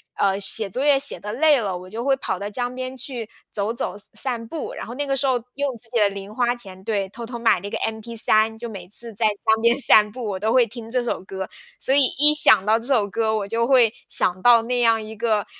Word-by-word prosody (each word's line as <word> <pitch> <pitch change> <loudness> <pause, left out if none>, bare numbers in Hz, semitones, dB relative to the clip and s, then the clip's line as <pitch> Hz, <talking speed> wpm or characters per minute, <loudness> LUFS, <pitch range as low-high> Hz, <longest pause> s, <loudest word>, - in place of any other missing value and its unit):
呃， 195 -1 +1
写 200 +1 +2
作 255 +8 -3
业 285 -2 +4
写 280 -8 +3
得 210 +1 -6
累 290 +1 +3
了， 190 -4 -3
我 185 +1 -12
就 230 +3 -6
会 270 0 +1
跑 225 - -3
到 200 +2 -5
江 245 +3 -4
边 255 0 -6
去 245 -3 -6 0.2
走 205 +2 -2
走 235 - -3 0.2
散 240 -4 -4
步。 310 +6 -6
然 - - -7
后 235 - -8
那 290 +1 -3
个 275 - 0
时 275 - -1
候 250 -3 +1
用 275 -3 -3
自 225 - -7
己 235 -2 -1
的 205 - +4
零 200 +2 -9
花 245 -1 +1
钱 190 -6 -9
对， 200 -3 -2
偷 230 +4 -9
偷 235 0 -7
买 225 -6 +2
了 200 - -6
一 - - -6
个 - - -4
mp3， 220 0 0
就 235 - -6
每 185 -4 -10
次 230 +1 +3
在 220 +2 +1
江 220 +2 0
边 235 +2 +3
散 210 -5 +5
步， 240 -1 -6
我 190 - -4
都 220 +2 -1
会 245 -2 +3
听 225 0 -10
这 250 -1 0
首 235 -5 -4
歌。 190 0 -6 0.3
所 270 - +2
以 285 - +5 0.2
一 300 +1 +7
想 215 -9 +5
到 220 +1 +3
这 230 - -6
首 230 -7 +2
歌， 220 +2 -1
我 200 -1 -4
就 230 +2 -1
会 245 -4 +4 0.2
想 185 0 +2
到 235 -2 +5
那 245 +1 -1
样 225 -1 +3
一 220 +1 -9
个， 215 -2 0
225 Hz, 285 characters per minute, -22 LUFS, 210-245 Hz, 0.3 s, 一